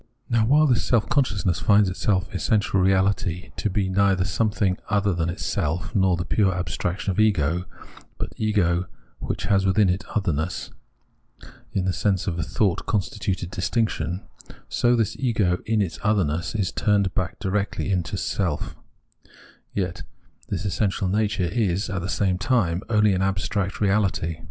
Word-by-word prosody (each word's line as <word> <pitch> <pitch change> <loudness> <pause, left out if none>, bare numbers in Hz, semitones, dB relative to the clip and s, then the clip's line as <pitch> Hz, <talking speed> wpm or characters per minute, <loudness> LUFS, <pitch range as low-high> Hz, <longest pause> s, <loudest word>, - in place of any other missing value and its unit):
Now 115 -2 +3
while 150 +4 +5
this 125 -5 +2
self 115 -3 +2
consciousness 105 - +1
finds 105 -1 +4
its 95 - -5
essential 95 0 +1
reahty 95 -1 +1
to 105 - 0
be 95 0 0
neither 95 -1 +2
something 105 -2 0
other 100 -2 +2
than 85 -1 -1
itself, 85 -1 -2
nor 95 -4 +3
the 90 - -3
pure 100 0 +2
abstraction 90 +2 -2
of 95 - -2
ego, 90 -5 +2 0.5
but - - -5
ego 90 -5 +1 0.3
which - - -4
has 95 -1 +2
within 95 +1 +3
it 90 +3 0
otherness 90 -5 -1 0.3
— - - -40
otherness - - -17
in 95 -2 0
the 95 - +1
sense 95 -2 0
of 85 -3 -2
a - - +1
thought 90 +2 0
con 105 - +2
stituted 95 -1 -4
distinction 95 -3 -1 0.2
— - - -18
so 120 0 +2
that - - +3
this 110 -4 0
ego 105 -8 +1
in 110 -2 +2
its 85 -4 -5
otherness 90 -4 0
is 100 -4 0
turned 100 -3 +1
back 90 -4 -2
directly 100 -1 -1
into 90 -5 -1
itself; - - -2 1.0
yet 90 -3 -2 0.5
this 95 0 -3
essential 100 -1 0
nature 105 -1 0
is, 100 +1 0
at 95 -3 -2
the 90 - -4
same 95 -3 0
time, 95 -9 +1
only 105 -2 +4
an 95 - 0
abstract 95 +1 -1
reahty. 95 -6 0
95 Hz, 165 wpm, -24 LUFS, 90-105 Hz, 1.0 s, while